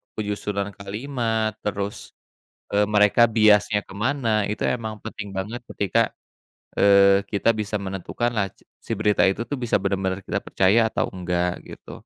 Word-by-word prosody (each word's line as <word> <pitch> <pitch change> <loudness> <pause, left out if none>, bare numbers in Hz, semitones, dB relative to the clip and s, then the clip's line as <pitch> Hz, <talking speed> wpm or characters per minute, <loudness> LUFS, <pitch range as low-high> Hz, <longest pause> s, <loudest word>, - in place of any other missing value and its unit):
penyusunan 105 -1 -3
kalimat, 110 +1 -2
terus, 100 0 -4 0.6
eee, 105 0 +2
mereka, 105 +2 +4 0.2
biasnya 105 -1 +5
ke - - -12
mana, 130 -3 0 0.2
itu 105 - -4
emang 110 -3 -5
penting 110 -2 -6
banget 110 +6 -4 0.2
ketika, 100 +3 +1 0.8
eee, 100 0 +5
kita 105 +2 +1
bisa 105 0 -3
menentukan 95 +5 -2
laj 100 -2 -1 0.3
si - - -7
berita 105 -1 +3
itu, 100 +4 -2
tuh, 145 - -2
bisa 115 - +1
bener-bener 95 -1 -1
kita - - -1
percaya 95 +5 +3
atau - - +1
enggak, 90 -1 -1
gitu. - - -11
105 Hz, 145 wpm, -23 LUFS, 100-110 Hz, 0.8 s, biasnya